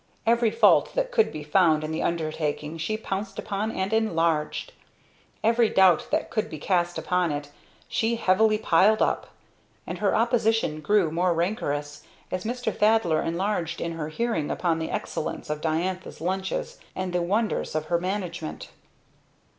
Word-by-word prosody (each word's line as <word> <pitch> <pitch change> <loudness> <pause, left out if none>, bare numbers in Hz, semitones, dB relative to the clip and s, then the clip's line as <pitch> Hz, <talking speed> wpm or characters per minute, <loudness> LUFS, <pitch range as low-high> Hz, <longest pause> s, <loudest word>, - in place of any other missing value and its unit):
Every 230 0 +3
fault - - +4
that - - 0
could 455 -3 +3
be 150 - -6
found 155 -1 +3
in 155 - -3
the 160 - -2
undertaking 155 -1 -2
she 215 +7 -1
pounced 200 -2 -4
upon 210 0 -2
and 190 -1 -2
enlarged; 165 -8 0 0.7
every 230 0 +4
doubt 185 -3 +4
that 310 +1 -1
could 215 -1 -1
be 155 - -6
cast 175 +2 0
upon 180 -2 0
it 145 0 -5 0.4
she 230 +1 0
heavily 215 0 +3
piled 210 +1 +4
up; - - -1 0.6
and - - -5
her - - +2
opposition 225 -8 +1
grew 195 -1 +2
more 175 +1 +1
rancorous 150 -6 -2 0.3
as 185 +2 -3
Mr. 245 +2 -2
Thaddler 210 -7 +3
enlarged 170 0 -2
in 170 - -2
her 165 -2 -4
hearing 195 -4 -1
upon 165 -3 0
the 160 - -3
excellence 150 - -4
of 150 0 -3
Diantha's 170 +4 -2
lunches 190 +3 -3 0.2
and 185 -1 -3
the 180 - +1
wonders 205 0 -1
of 155 0 -1
her 170 +2 +1
management. 180 -3 -4
180 Hz, 155 wpm, -26 LUFS, 160-215 Hz, 0.7 s, fault